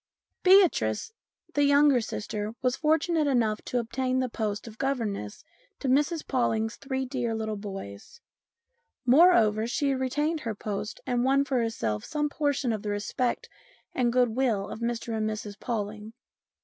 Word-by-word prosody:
Beatrice, 365 Hz, -, +4 dB, 0.4 s
the 290 Hz, -, +2 dB
younger 285 Hz, -2 st, +5 dB
sister, 215 Hz, 0 st, -4 dB
was 250 Hz, 0 st, +2 dB
fortunate 315 Hz, 0 st, +1 dB
enough 225 Hz, -6 st, +1 dB
to 250 Hz, -, -2 dB
obtain 255 Hz, +2 st, -1 dB
the 255 Hz, -1 st, 0 dB
post 215 Hz, -1 st, -3 dB
of 225 Hz, 0 st, -11 dB
governess 225 Hz, -, -2 dB, 0.3 s
to 275 Hz, -, -4 dB
Mrs 295 Hz, +5 st, +1 dB
Pawling's 225 Hz, -3 st, 0 dB
three 265 Hz, -1 st, -3 dB
dear 245 Hz, -3 st, -2 dB
little 220 Hz, -1 st, -3 dB
boys; 195 Hz, -, -8 dB, 0.9 s
moreover, 240 Hz, -7 st, +5 dB
she 275 Hz, +3 st, 0 dB
retained 295 Hz, +5 st, -1 dB
her 225 Hz, -7 st, -4 dB
post, 210 Hz, 0 st, -5 dB
and 245 Hz, -1 st, 0 dB
won 275 Hz, +2 st, +3 dB
for 265 Hz, -3 st, 0 dB
herself 115 Hz, -, -2 dB
some 295 Hz, -1 st, -1 dB
portion 285 Hz, -5 st, 0 dB
of 215 Hz, -, -3 dB
the 210 Hz, -, -4 dB
respect 205 Hz, +4 st, -2 dB, 0.5 s
and 245 Hz, -2 st, +1 dB
goodwill 240 Hz, -4 st, +1 dB
of -, -, -7 dB
Mr 235 Hz, -1 st, -2 dB
and 215 Hz, 0 st, 0 dB
Mrs 210 Hz, -1 st, -6 dB
Pawling. 215 Hz, -2 st, -4 dB
240 Hz, 150 wpm, -27 LUFS, 215-275 Hz, 0.9 s, younger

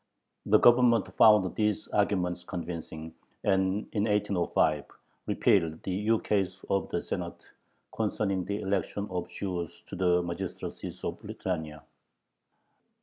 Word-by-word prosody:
The 105 Hz, -, +6 dB
Government 120 Hz, -2 st, +5 dB
found 105 Hz, -4 st, +6 dB
these 105 Hz, -2 st, 0 dB
arguments 90 Hz, -4 st, 0 dB
convincing, 80 Hz, -2 st, -6 dB, 0.3 s
and 95 Hz, +1 st, +1 dB
in 105 Hz, -1 st, 0 dB
1805 100 Hz, -7 st, +1 dB, 0.4 s
repealed 80 Hz, -5 st, +2 dB
the -, -, -3 dB
ukase 100 Hz, -2 st, 0 dB
of 100 Hz, -2 st, +1 dB
the -, -, -2 dB
Senate -, -, -6 dB, 0.4 s
concerning 100 Hz, -4 st, -1 dB
the 100 Hz, +1 st, -3 dB
election 100 Hz, +1 st, -1 dB
of 90 Hz, -1 st, -3 dB
Jews 90 Hz, -4 st, -4 dB
to -, -, -8 dB
the 90 Hz, -1 st, +2 dB
magistracies 85 Hz, +2 st, -6 dB
of -, -, -4 dB
Lithuania. 80 Hz, -5 st, -4 dB
95 Hz, 115 wpm, -29 LUFS, 90-105 Hz, 0.4 s, The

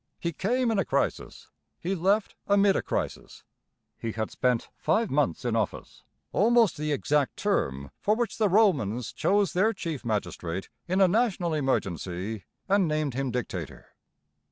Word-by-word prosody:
He 170 Hz, 0 st, -2 dB
came 240 Hz, -, +1 dB
in 215 Hz, -, +1 dB
a -, -, +3 dB
crisis; -, -, -2 dB, 0.3 s
he 180 Hz, +3 st, -2 dB
left 195 Hz, +4 st, +1 dB
amid 200 Hz, -1 st, +4 dB
a -, -, +1 dB
crisis. -, -, -4 dB, 0.6 s
He 115 Hz, -1 st, -3 dB
had 110 Hz, -1 st, -3 dB
spent 125 Hz, -2 st, 0 dB
five 225 Hz, -2 st, +1 dB
months 145 Hz, -2 st, 0 dB
in 120 Hz, -2 st, 0 dB
office, 110 Hz, -3 st, -3 dB, 0.3 s
almost 230 Hz, -2 st, +4 dB
the 150 Hz, 0 st, -2 dB
exact 145 Hz, 0 st, +1 dB
term 70 Hz, -, -1 dB
for 210 Hz, -, +2 dB
which 235 Hz, 0 st, -2 dB
the 215 Hz, -2 st, +3 dB
Romans 135 Hz, -, +2 dB
chose 200 Hz, -1 st, +2 dB
their 210 Hz, +5 st, +3 dB
chief 160 Hz, -, -5 dB
magistrate 95 Hz, -5 st, -3 dB, 0.2 s
in 185 Hz, +2 st, +1 dB
a 190 Hz, -, +7 dB
national 190 Hz, -4 st, +1 dB
emergency 100 Hz, -, -2 dB, 0.2 s
and 195 Hz, -2 st, +3 dB
named 155 Hz, -3 st, -1 dB
him 135 Hz, +1 st, -1 dB
dictator. 95 Hz, -, -5 dB
160 Hz, 155 wpm, -27 LUFS, -, 0.6 s, a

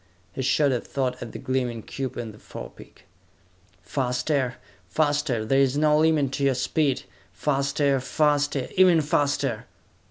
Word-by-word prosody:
He -, -, -4 dB
shot 140 Hz, +2 st, +2 dB
a 125 Hz, -, 0 dB
thought 130 Hz, -2 st, -3 dB
at 120 Hz, -, -6 dB
the -, -, -7 dB
gleaming 125 Hz, -4 st, -2 dB
cube 130 Hz, -2 st, -5 dB
in 115 Hz, -2 st, -5 dB
the 105 Hz, -, -16 dB
forepeak. -, -, -11 dB, 0.8 s
"Faster! 125 Hz, 0 st, -1 dB, 0.3 s
Faster! 145 Hz, -, 0 dB
There 135 Hz, +4 st, +2 dB
is 135 Hz, 0 st, +2 dB
no 150 Hz, 0 st, +4 dB
limit 155 Hz, -4 st, +3 dB
to 140 Hz, -, -3 dB
your 135 Hz, -1 st, +3 dB
speed! 135 Hz, +1 st, 0 dB, 0.3 s
Faster! 140 Hz, +5 st, +1 dB
Faster! 145 Hz, +1 st, +1 dB
Even 180 Hz, -3 st, +6 dB
faster!" 140 Hz, -5 st, 0 dB
135 Hz, 140 wpm, -25 LUFS, 125-145 Hz, 0.8 s, Even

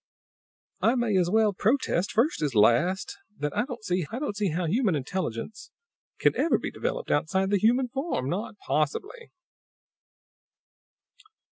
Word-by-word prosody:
"I 230 Hz, -, +3 dB
may 240 Hz, -5 st, +1 dB
as 180 Hz, -2 st, +2 dB
well 215 Hz, +1 st, +3 dB
protest, 205 Hz, -3 st, +1 dB
first 245 Hz, -, +1 dB
as 145 Hz, -5 st, -1 dB
last, 165 Hz, -, +2 dB, 0.2 s
that 150 Hz, 0 st, -3 dB
I -, -, +1 dB
don't 245 Hz, -5 st, -8 dB, 0.5 s
see 210 Hz, -1 st, 0 dB
how 170 Hz, +2 st, -1 dB
human 200 Hz, +1 st, +1 dB
intelligence 150 Hz, -, -4 dB, 0.5 s
can -, -, +2 dB
ever 330 Hz, -, +2 dB
be -, -, -5 dB
developed -, -, -3 dB
outside 190 Hz, +6 st, +1 dB
the 200 Hz, -, +3 dB
human 245 Hz, +5 st, +3 dB
form. 270 Hz, -, -2 dB
Not 205 Hz, +7 st, -3 dB
possibly!" 395 Hz, -, -2 dB
200 Hz, 130 wpm, -27 LUFS, 165-245 Hz, 0.5 s, I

